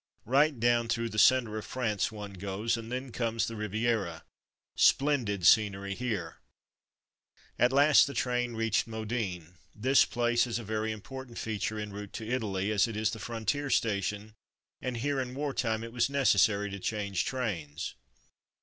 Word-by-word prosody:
Right 140 Hz, +2 st, +3 dB
down 120 Hz, 0 st, +2 dB
through 115 Hz, 0 st, 0 dB
the 110 Hz, -, -2 dB
centre 115 Hz, -3 st, +4 dB
of -, -, -8 dB
France 115 Hz, -5 st, -1 dB
one 105 Hz, -2 st, -8 dB
goes, 100 Hz, +4 st, -2 dB
and 115 Hz, 0 st, -7 dB
then 130 Hz, +1 st, -4 dB
comes 115 Hz, -1 st, -1 dB
the 115 Hz, -, -5 dB
Riviera. 105 Hz, -5 st, -1 dB, 0.5 s
Splendid 120 Hz, -, +2 dB
scenery 100 Hz, 0 st, +4 dB
here. 100 Hz, -8 st, -4 dB, 1.2 s
At 120 Hz, +2 st, +4 dB
last 145 Hz, +2 st, +6 dB
the 140 Hz, -, -6 dB
train 125 Hz, -1 st, -1 dB
reached 115 Hz, -1 st, +1 dB
Modane. 105 Hz, -7 st, -4 dB, 0.2 s
This 130 Hz, +6 st, +4 dB
place 120 Hz, 0 st, +1 dB
is 120 Hz, -, -2 dB
a 120 Hz, -, -6 dB
very 110 Hz, +1 st, -2 dB
important 125 Hz, +3 st, -8 dB
feature 110 Hz, 0 st, -3 dB
en 105 Hz, -1 st, -5 dB
route 105 Hz, -1 st, -8 dB
to 110 Hz, -, -6 dB
Italy, 105 Hz, -5 st, -1 dB
as 105 Hz, +2 st, +3 dB
it 115 Hz, -2 st, -5 dB
is 110 Hz, 0 st, +1 dB
the 110 Hz, -, -6 dB
frontier 120 Hz, +6 st, -2 dB
station, 105 Hz, -2 st, -1 dB, 0.5 s
and 125 Hz, -2 st, -3 dB
here 140 Hz, +3 st, -1 dB
in 125 Hz, 0 st, -5 dB
war 145 Hz, 0 st, -2 dB
time 110 Hz, -3 st, -1 dB
it 115 Hz, 0 st, -8 dB
was 125 Hz, +2 st, +1 dB
necessary 105 Hz, -7 st, +3 dB
to 100 Hz, -, -6 dB
change 100 Hz, -2 st, -1 dB
trains. 85 Hz, -, -3 dB
110 Hz, 165 wpm, -30 LUFS, 105-125 Hz, 1.2 s, last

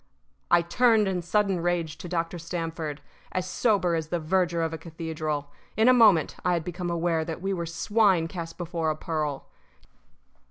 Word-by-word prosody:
I 175 Hz, -, +5 dB
turned 220 Hz, +3 st, +3 dB
in 185 Hz, -2 st, -1 dB
sudden 195 Hz, +1 st, +1 dB
rage 170 Hz, -3 st, -1 dB
to 175 Hz, -, -7 dB
Dr. 170 Hz, 0 st, -2 dB
Stamford, 165 Hz, -3 st, -4 dB, 0.3 s
as 185 Hz, 0 st, -1 dB
sober 195 Hz, -4 st, +1 dB
as 160 Hz, -2 st, -1 dB
the 175 Hz, -, -1 dB
verger 170 Hz, 0 st, +1 dB
of 165 Hz, 0 st, -2 dB
a -, -, -3 dB
cathedral. 155 Hz, -3 st, -4 dB, 0.3 s
In 220 Hz, +2 st, +4 dB
a 255 Hz, -, +8 dB
moment 210 Hz, -10 st, +5 dB
I 180 Hz, -, +2 dB
had 170 Hz, -2 st, 0 dB
become 180 Hz, 0 st, -4 dB
aware 170 Hz, -1 st, 0 dB
that 160 Hz, 0 st, -5 dB
we 195 Hz, +2 st, -2 dB
were 170 Hz, -2 st, -3 dB
swine 185 Hz, 0 st, +2 dB
cast 165 Hz, -1 st, -7 dB
before 170 Hz, -2 st, -2 dB
a 155 Hz, -, 0 dB
pearl. 155 Hz, -3 st, -3 dB
170 Hz, 175 wpm, -26 LUFS, 160-185 Hz, 0.3 s, a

